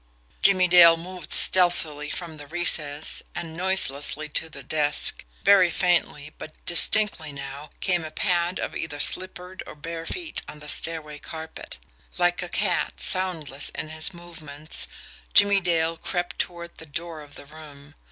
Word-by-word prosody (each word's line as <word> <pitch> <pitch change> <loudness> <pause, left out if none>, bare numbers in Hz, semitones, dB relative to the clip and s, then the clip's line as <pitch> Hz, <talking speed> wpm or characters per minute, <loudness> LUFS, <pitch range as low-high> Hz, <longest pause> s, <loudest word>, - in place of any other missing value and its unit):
Jimmie 185 -2 +5
Dale 170 -2 +7
moved 175 -1 -9
stealthily 165 -5 +4
from 165 -1 -6
the 145 -1 -11
recess, 155 -3 +2
and 165 -2 -6
noiselessly 155 -5 0
to 160 +2 -2
the 140 -2 -11
desk. 150 +2 0 0.2
Very 195 -2 +6
faintly, 165 -4 0
but 155 - -9
distinctly 175 -2 +2
now, 140 +1 -8
came 180 -3 0
a 155 - -6
pad 175 +1 0
of - - -4
either 145 -3 -5
slippered 185 +3 0
or - - -10
bare 165 +2 -7
feet 345 -3 -3
on 150 - -10
the 150 0 -10
stairway 155 -2 0
carpet. 160 - -8 0.4
Like 175 0 +1
a 175 - -6
cat, 175 -7 -1
soundless 165 -7 +1
in 155 - -5
his 155 +3 +1
movements, 165 -3 -7 0.5
Jimmie 200 -1 +5
Dale 165 -2 0
crept 175 0 -4
toward 170 -1 -5
the 160 - -10
door 165 +1 -6
of 145 -1 -15
the - - -12
room. 150 -1 -14
165 Hz, 150 wpm, -24 LUFS, 150-180 Hz, 0.5 s, Dale